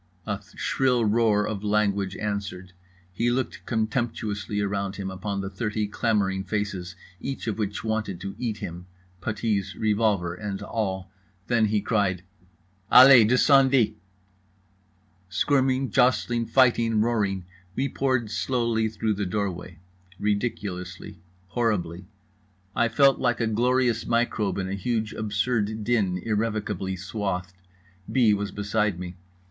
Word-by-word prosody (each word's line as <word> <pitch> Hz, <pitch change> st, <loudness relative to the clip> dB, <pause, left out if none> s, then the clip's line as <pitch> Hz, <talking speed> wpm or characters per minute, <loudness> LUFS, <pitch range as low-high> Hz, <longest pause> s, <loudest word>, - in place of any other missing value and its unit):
A 105 Hz, -1 st, -3 dB
shrill 125 Hz, -3 st, +1 dB
roar 105 Hz, -1 st, +3 dB
of 105 Hz, -2 st, -4 dB
language 100 Hz, -2 st, +1 dB
answered. 100 Hz, -3 st, -4 dB, 0.4 s
He 115 Hz, +6 st, +1 dB
looked 125 Hz, +1 st, -2 dB
contemptuously 110 Hz, -3 st, -2 dB
around 100 Hz, -1 st, -2 dB
him, 95 Hz, -1 st, -4 dB
upon 100 Hz, +1 st, -3 dB
the 95 Hz, -, -4 dB
thirty 105 Hz, +1 st, -2 dB
clamouring 100 Hz, -3 st, 0 dB
faces 100 Hz, -3 st, -3 dB, 0.2 s
each 135 Hz, 0 st, -5 dB
of 110 Hz, -1 st, -3 dB
which 105 Hz, -1 st, -2 dB
wanted 110 Hz, -5 st, -2 dB
to 100 Hz, +1 st, -5 dB
eat 115 Hz, -4 st, -2 dB
him—puttees, 95 Hz, +3 st, -4 dB
revolver 105 Hz, -5 st, +1 dB
and 100 Hz, +1 st, -5 dB
all. 95 Hz, -4 st, -3 dB, 0.3 s
Then 115 Hz, -2 st, +2 dB
he 105 Hz, 0 st, +1 dB
cried: 100 Hz, -4 st, 0 dB, 0.7 s
"Allez, 125 Hz, -3 st, +9 dB
descendez." 130 Hz, -1 st, +5 dB, 1.4 s
Squirming, 130 Hz, +6 st, +1 dB
jostling, 120 Hz, -2 st, +2 dB
fighting, 120 Hz, -4 st, +3 dB
roaring, 105 Hz, -5 st, 0 dB, 0.3 s
we 135 Hz, -, 0 dB
poured 130 Hz, -5 st, 0 dB
slowly 115 Hz, -4 st, 0 dB
through 110 Hz, 0 st, -1 dB
the 100 Hz, -1 st, -2 dB
doorway. 90 Hz, -3 st, -3 dB, 0.4 s
Ridiculously. 100 Hz, -4 st, -3 dB, 0.3 s
Horribly. 90 Hz, -5 st, -1 dB, 0.7 s
I 120 Hz, -, +3 dB
felt 135 Hz, +4 st, +4 dB
like 120 Hz, -2 st, +1 dB
a 115 Hz, -, +1 dB
glorious 120 Hz, +1 st, +1 dB
microbe 115 Hz, -5 st, 0 dB
in 95 Hz, -1 st, -2 dB
huge 110 Hz, +2 st, -2 dB
absurd 110 Hz, 0 st, -1 dB
din 105 Hz, -6 st, +1 dB
irrevocably 105 Hz, -2 st, -2 dB
swathed. 95 Hz, -1 st, -3 dB, 0.6 s
B. 120 Hz, -5 st, +4 dB
was 100 Hz, 0 st, -1 dB
beside 100 Hz, -1 st, -1 dB
me. 90 Hz, 0 st, -7 dB
105 Hz, 120 wpm, -25 LUFS, 95-115 Hz, 1.4 s, Allez